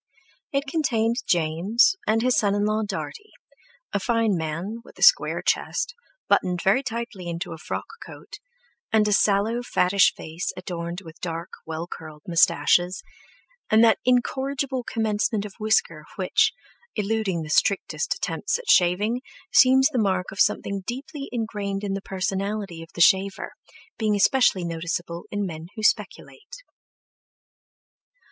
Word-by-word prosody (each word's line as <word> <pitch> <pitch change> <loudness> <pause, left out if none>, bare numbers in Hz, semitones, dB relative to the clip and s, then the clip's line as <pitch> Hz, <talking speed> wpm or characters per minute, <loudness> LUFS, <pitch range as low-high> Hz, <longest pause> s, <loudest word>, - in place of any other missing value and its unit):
It 275 0 0
contained 240 -7 0
James 175 - +3
and 225 +1 +2
his 255 0 +3
son 200 -1 +2
in 205 0 +1
law 215 +1 +1
Dartie, 220 - -6 0.6
a - - +1
fine 230 -1 +1
man, 165 +7 -4
with - - -17
a - - -2
square - - +5
chest, - - -1 0.3
buttoned 180 -1 +1
very 200 +7 +3
tightly 235 -7 -5
into 170 +2 -4
a 160 - -10
frock - - -4 0.2
coat, - - -12 0.5
and 215 -1 +3
a 210 - +2
sallow, 210 +4 +2
fattish 200 -5 +3
face 160 +3 -5
adorned 175 0 -5
with 165 -2 -13
dark, 170 +1 -5 0.2
well 160 +1 -4
curled 155 -3 -10
moustaches, 175 +1 +3 0.7
and 220 +1 +5
that 230 - +5
incorrigible 265 +1 0
commencement 215 -2 -1
of 205 - -8
whisker 180 -8 +1
which, 185 -2 +2 0.4
eluding 210 -5 -1
the 155 - -7
strictest 335 - +1
attempts - - -2
at - - 0
shaving, 205 +7 +3 0.3
seems 265 0 +6
the 260 -5 -1
mark 190 -3 0
of 195 - -10
something 200 0 +1
deeply 275 +3 -6
ingrained 210 -4 -3
in 200 -1 -2
the 195 - -3
personality 195 -1 -3
of 165 - -11
the 170 - -2
shaver, 190 +3 +3 0.5
being 215 -2 +1
especially 205 -4 +3
noticeable 170 +1 -4
in 205 -1 -2
men 160 -2 -7
who 215 - -6
speculate. 485 - -2
200 Hz, 140 wpm, -24 LUFS, 175-235 Hz, 0.7 s, seems